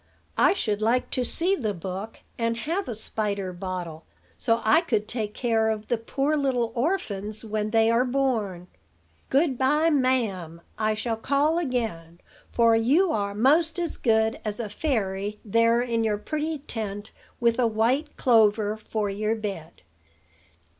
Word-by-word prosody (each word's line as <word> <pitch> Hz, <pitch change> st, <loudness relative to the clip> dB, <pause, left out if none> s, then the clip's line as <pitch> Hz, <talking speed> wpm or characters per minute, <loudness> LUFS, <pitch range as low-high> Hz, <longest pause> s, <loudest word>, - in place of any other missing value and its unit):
"I -, -, +5 dB
should 215 Hz, -, -2 dB
like 235 Hz, +3 st, +1 dB
to 255 Hz, -, 0 dB
see 350 Hz, +10 st, +1 dB
the 215 Hz, -, -2 dB
book; 190 Hz, +5 st, -6 dB, 0.2 s
and 230 Hz, 0 st, 0 dB
have 335 Hz, -, -2 dB
a 235 Hz, -, -3 dB
spider 205 Hz, -3 st, -3 dB
bottle, 175 Hz, -3 st, -5 dB, 0.3 s
so 230 Hz, -1 st, +1 dB
I 310 Hz, +9 st, +5 dB
could 220 Hz, -11 st, -1 dB
take 215 Hz, -3 st, -3 dB
care 225 Hz, -2 st, +1 dB
of 215 Hz, -1 st, -3 dB
the 240 Hz, -, +2 dB
poor 275 Hz, +6 st, -1 dB
little 255 Hz, -5 st, 0 dB
orphans 215 Hz, -, -1 dB
when 215 Hz, -1 st, -2 dB
they 225 Hz, +1 st, +3 dB
are 235 Hz, +2 st, +3 dB
born. 240 Hz, -9 st, -1 dB, 0.6 s
Good 275 Hz, -2 st, +2 dB
by, 300 Hz, +5 st, +3 dB
ma'am. 220 Hz, -, 0 dB
I 215 Hz, 0 st, 0 dB
shall 225 Hz, +1 st, -2 dB
call 285 Hz, +7 st, +1 dB
again; 220 Hz, -, -3 dB, 0.3 s
for 230 Hz, -1 st, +4 dB
you 290 Hz, +11 st, +3 dB
are 200 Hz, -5 st, -1 dB
'most 315 Hz, -, +3 dB
as 345 Hz, -2 st, -2 dB
good 220 Hz, -1 st, +1 dB
as 210 Hz, +1 st, -3 dB
a 225 Hz, -3 st, -3 dB
fairy 205 Hz, -5 st, -2 dB
there 230 Hz, +2 st, +3 dB
in 230 Hz, -2 st, 0 dB
your 215 Hz, -2 st, +1 dB
pretty 310 Hz, +7 st, -3 dB
tent, 215 Hz, -6 st, -6 dB, 0.3 s
with 235 Hz, 0 st, +2 dB
a 245 Hz, -, +4 dB
white 240 Hz, +8 st, 0 dB
clover 215 Hz, -3 st, +3 dB
for 215 Hz, -1 st, -3 dB
your 215 Hz, +2 st, -1 dB
bed." 195 Hz, -, -7 dB
225 Hz, 155 wpm, -25 LUFS, 210-260 Hz, 0.6 s, I